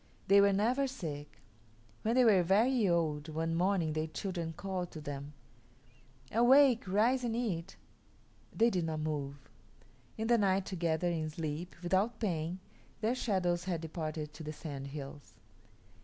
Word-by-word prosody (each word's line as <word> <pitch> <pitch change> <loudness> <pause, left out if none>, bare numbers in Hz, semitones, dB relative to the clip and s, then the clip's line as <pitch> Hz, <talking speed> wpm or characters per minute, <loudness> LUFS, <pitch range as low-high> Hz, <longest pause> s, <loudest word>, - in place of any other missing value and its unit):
They 200 +1 +7
were 200 0 +5
never 240 +8 +2
sick. 150 - -7 0.6
When 225 +2 0
they 255 -1 +5
were 200 -5 +6
very 210 +5 +3
old, 160 -3 0
one 165 +1 -2
morning 175 -2 +1
their 155 +1 -1
children 170 0 -4
called 180 +1 -4
to 155 - -7
them, 145 -1 -6 1.0
"Awake, 245 0 +5
rise 230 +7 +2
and 230 -2 -1
eat." 195 -7 -2 0.8
They 230 +1 +3
did 180 -4 0
not 155 -1 -2
move. 145 -2 -3 0.8
In 220 - -2
the 235 0 +4
night, 195 -1 +2
together, 170 -2 -1
in 160 -2 -2
sleep, 160 +2 -5
without 195 +6 +1
pain, 175 -4 -2 0.4
their 225 +2 +2
shadows 180 -8 0
had 175 -4 -2
departed 155 -2 -5
to 160 - -9
the 155 0 -5
Sandhills. 140 -3 -8
175 Hz, 145 wpm, -33 LUFS, 155-210 Hz, 1.0 s, They